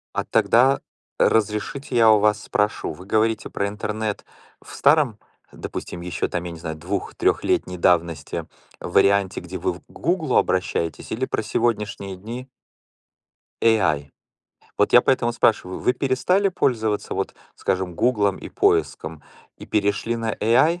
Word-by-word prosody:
А - - 0
тогда 130 +4 +3 0.4
разрешите, 110 +5 0
я 115 -1 +6
у 110 - +6
вас 105 0 +2
спрошу: 105 0 -1
вы 90 +5 -12
говорите 110 +1 0
про 100 - -1
интернет 105 0 -4 0.4
в - - -13
старом, 140 -7 +3 0.3
допустим, 85 - -7
ещё 85 -1 -3
там, 85 - -3
я 90 - -5
не 85 - -9
знаю, 80 -1 -5
двух-трехлетней 90 +1 -1
давности, 85 -3 0 0.3
в 85 - -7
варианте, 100 0 +3
где - - -7
вы - - -1
в - - -12
к - - -36
"Гуглу" 160 -4 -1
обращаетесь, 85 -4 0
или 120 +4 -1
про - - -2
сегодняшние 105 -4 -2
дни 120 +7 -8 1.1
AI? 80 -11 +2 0.7
Вот 105 - +2
я 120 - +9
поэтому 120 -3 +1
спрашиваю: 105 -5 +1
Вы - - +2
перестали 140 +10 +1
пользоваться, 110 - -1
вот - - -3 0.2
скажем 90 -1 -2
"Гуглом" 105 -3 +1
и - - -8
поиском 80 -1 0 0.3
и - - -11
перешли 105 +2 0
на 115 -1 -2
AI 150 +11 +3
105 Hz, 145 wpm, -23 LUFS, 95-120 Hz, 1.1 s, я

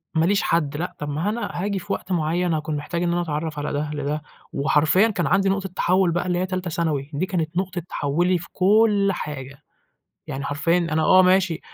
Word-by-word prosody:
ما 160 0 +3
ليش 200 +2 +2
حد 150 -3 0
لأ 175 +3 -4
طَب 150 - -4
ما 155 +8 -1
أنا 235 +2 -3
هاجي 195 +2 -2
في - - -4
وقت 185 - -6
معيّن 170 +1 0
هاكون 155 0 -2
محتاج 170 +4 -3
إن 170 - +1
أنا 175 - +1
أتعرّف 155 -2 -3
على 145 - -3
ده 150 +1 -2
لده، 145 +1 -2 0.3
وحرفيًا 155 +8 +3
كان 180 -7 -1
عندي 195 +1 +3
نقطة 195 0 -1
تحوّل 185 0 +2
بقى 175 +2 -1
اللي 175 -1 0
هي 185 - 0
تالتة 185 -1 -3
ثانوي، 155 -4 -1
دي 145 +6 0
كانت 170 -3 -2
نقطة 185 -1 -2
تحوّلي 175 +6 +1
في 170 - -9
كل 205 +1 +4
حاجة، 135 -5 -7 0.6
يعني 135 +1 -4
حرفيًا 155 +4 +1
أنا 160 -2 0
آه 185 - +6
ماشي، 185 -2 +3
170 Hz, 210 wpm, -23 LUFS, 150-185 Hz, 0.6 s, آه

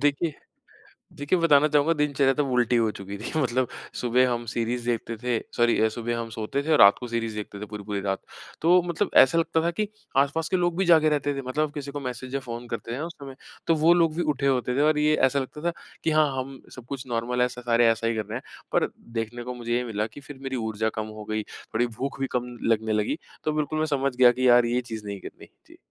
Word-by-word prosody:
देखिए 145 +2 +1 0.8
देखिए 150 +4 0
बताना 150 -3 +5
चाहूँगा 150 +2 +3
दिनचर्या 140 -3 +2
तब 145 -3 0
उल्टी 125 -1 +3
हो 115 -2 +2
चुकी 100 -1 -7
थी। 110 - -5
मतलब 130 -2 +1 0.3
सुबह 125 +1 +3
हम 120 0 -3
सीरीज़ 120 +1 -2
देखते 115 -1 -2
थे। 120 -2 +1 0.2
सॉरी, 120 -2 +3
सुबह 120 +1 -3
हम 115 -1 -4
सोते 110 +5 -3
थे 160 +2 0
और 155 - +5
रात 100 0 +8
को 125 - -6
सीरीज़ 115 -2 -2
देखते 105 -1 -6
थे, 105 - -5
पूरी-पूरी 105 -1 -4
रात। 95 0 -2 0.4
तो 175 +3 +5
मतलब 175 +3 -1
ऐसा 135 +6 +3
लगता 165 0 +1
था 170 - +1
कि 210 -1 0 0.3
आसपास 160 +4 -2
के 185 - +1
लोग 175 -1 0
भी 195 - +3
जागें 160 -2 +6
रहते 145 -1 0
थे। 135 - -4
मतलब 150 +3 0
किसी 145 -1 -5
को 145 +1 -5
मैसेज़ 130 0 -6
या 140 - 0
फ़ोन 120 -1 -7
करते 115 0 -5
हैं 125 - -3
ना, 155 - -3
उस 170 - -9
समय 135 -2 -10 0.3
तो 165 - +4
वो 170 - +7
लोग 165 -3 +3
भी 175 - +1
उठे 140 - -2
होते 125 -2 +1
थे - - +2
और 155 - +2
ये 150 +1 +3
ऐसा 140 +2 +3
लगता 135 +3 -5
था - - 0 0.3
कि 160 - +2
हाँ, 155 0 +4
हम 135 0 -5
सब 125 - -10
कुछ 135 -2 -5
नॉर्मल 120 +1 -1
है 125 - +3
स 125 - -11
सारे 120 -1 +3
ऐसा 115 0 -1
ही 115 - +1
कर 110 - -1
रहे 110 +4 -4
हैं। - - -13 0.3
पर - - +3 0.3
देखने 115 +2 -4
को 125 +1 -5
मुझे 120 -1 -5
ये 125 - 0
मिला 110 -2 -2
कि 115 +6 -12
फिर 140 0 -11
मेरी 135 -1 -3
ऊर्जा 110 -1 -1
कम 110 0 -3
हो 105 - -7
गई। 110 0 -1
थोड़ी 115 +3 -3
भूख 130 +4 -5
भी 135 - +1
कम 125 -1 -3
लगने 110 -1 +1
लगी। 105 +8 0 0.3
तो 155 - +1
बिल्कुल 155 0 -1
मैं 155 - +1
समझ 135 -1 -1
गया 125 -1 +7
कि 130 +1 +1
यार 120 -1 +6
ये 120 +1 +1
चीज़ 110 -2 -6
नहीं 100 -1 -5
करनी। - - -11 0.2
जी। - - -16
125 Hz, 255 wpm, -26 LUFS, 115-145 Hz, 0.8 s, रात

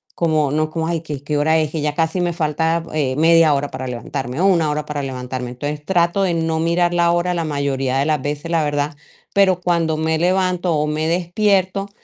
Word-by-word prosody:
como 155 -4 +1
no 155 +1 0
como: 160 0 -3
"Ay, 170 -1 -1
¿que 150 -4 -7
qué 150 +1 -2
hora 160 +2 +3
es? 155 -1 -1
Que 160 - -3
ya 150 0 -1
casi 165 +3 0
me 175 - 0
falta, 160 +1 0
eh, 140 -4 0
media 165 -1 +5
hora 140 +1 -2
para 130 - -5
levantarme 125 +2 -5
o 190 - +2
1 170 -5 +3
hora 150 0 -2
para 150 -1 -4
levantarme", 125 -1 -5
entonces, 145 +4 -5
trato 175 +2 +1
de 180 -3 +1
no 160 -1 -1
mirar 170 +1 +1
la 170 -1 +3
hora 175 +1 +1
la 170 -1 -1
mayoría 140 -3 -1
de 135 - +1
las 155 -1 0
veces, 145 +3 -4
la 165 -2 +2
verdad, 145 0 -1 0.4
pero 190 -2 +3
cuando 170 -3 +1
me 160 0 0
levanto 180 0 +1
o 150 0 +1
me 155 +1 -1
despierto, 190 +3 +1
160 Hz, 220 wpm, -19 LUFS, 145-170 Hz, 0.4 s, media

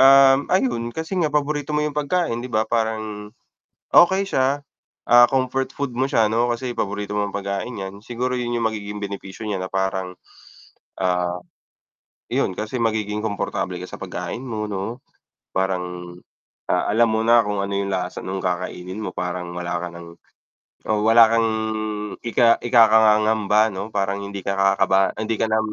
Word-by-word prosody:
um, 135 0 +8
ayun 120 -10 +1
kasi 160 +8 -5
nga 155 - +2
paborito 150 0 -1
mo 150 - +1
yung 150 -1 -3
pagkain 150 -4 0
'di 125 - -6
ba 110 -1 +1
parang 110 -2 -2 0.6
okey 190 +3 +6
siya, 140 -5 0 0.5
ah, 120 0 +9
comfort 130 0 -1
food 140 -2 -3
mo 130 - +2
siya 115 -6 +2
'no 120 +2 +2
kasi 125 +1 -4
paborito 105 0 -3
mong 100 -1 -2
pagkain 100 +4 -3
'yan. 95 +1 -7
Siguro 125 +3 -3
yun 120 -1 -2
yung 115 -1 +1
magiging 105 -1 -6
benepisyo 100 0 -6
niya 100 -2 -1
na 95 - -4
parang, 95 -1 -1 0.9
ah, 90 -1 0 0.9
'yon - - +1
kasi 110 +3 -3
magiging 105 -2 -1
komportable 100 -3 -2
ka 90 - -7
sa - - -10
pagkain 125 - -5
mo 110 -4 -3
'no? 105 +5 -5 0.5
Parang, 90 -2 -2 0.5
ah, 90 - +1
alam 115 +2 +4
mo 110 - +1
na 120 0 +6
kung 105 -1 -2
ano 100 - -4
yung 100 0 -1
lasa 90 -1 -3
nung 95 0 -4
kakainin 90 +1 -3
mo, 90 - -4
parang 90 0 -4
wala 90 0 -2
ka 90 - -3
ng 85 0 -11 0.7
o 105 -1 +1
wala 115 +1 +7
kang 115 -1 +3 0.7
ika 115 0 +4
ikakapangamba 110 -2 +4
'no. 95 +3 -5
Parang 100 0 -1
hindi 100 0 -6
ka 100 +1 -2
kakaba 95 0 +3
hindi 110 +1 -1
ka 110 - +2
na 110 - +3
110 Hz, 165 wpm, -22 LUFS, 95-120 Hz, 0.9 s, ah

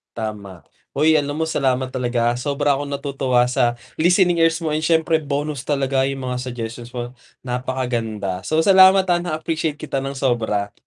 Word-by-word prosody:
Tama. 105 -5 -6 0.3
Hoy, 155 +3 +4
alam 145 -1 -1
mo 155 - -3
salamat 130 -3 0
talaga. 120 -1 0
Sobra 140 +1 0
akong 145 0 -5
natutuwa 135 -3 0
sa 125 -2 +2 0.2
listening 175 +1 +3
ears 165 +1 +1
mo 160 - -2
and 155 +1 -1
syempre 160 0 +3
bonus 145 -2 -3
talaga 135 -2 +1
yung 135 -1 -3
mga 125 - -2
suggestions 120 -1 -6
mo, 120 +1 -6 0.2
napakaganda. 120 -7 -3
So, 155 +1 +2
salamat 190 +1 +7
ha 175 - +4
na-appreciate 160 -2 -2
kita 150 -2 -4
ng 135 - -4
sobra. 115 -6 -1
135 Hz, 160 wpm, -21 LUFS, 120-155 Hz, 0.3 s, salamat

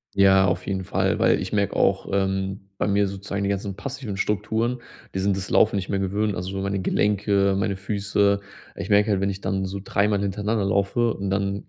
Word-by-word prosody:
Ja, 95 -1 +6
auf 90 0 -1
jeden 95 -1 -2
Fall, - - 0
weil - - +3
ich - - -5
merke 100 -2 0
auch, - - +2
ähm, 95 0 -1
bei - - 0
mir 100 0 +2
sozusagen 100 +1 -4
die 100 - 0
ganzen 100 -1 -2
passiven 130 -4 -5
Strukturen, 110 +5 -1 0.4
die - - 0
sind 100 0 +1
das 95 0 -5
Laufen - - +4
nicht 95 -2 -3
mehr 100 - 0
gewöhnt, 100 +2 0
also 90 +2 -4
meine 100 0 -1
Gelenke, 100 0 +2
meine 100 0 0
Füße. 100 0 +1 0.4
Ich - - -6
merke 105 +1 +4
halt, 100 -2 +1
wenn 100 0 +1
ich 95 - -8
dann 95 0 -1
so 95 +1 -5
dreimal 100 0 +1
hintereinander 100 +1 -1
laufe 100 +4 +1
und 100 -1 -3
dann 100 0 -1
100 Hz, 205 wpm, -24 LUFS, 95-100 Hz, 0.4 s, Ja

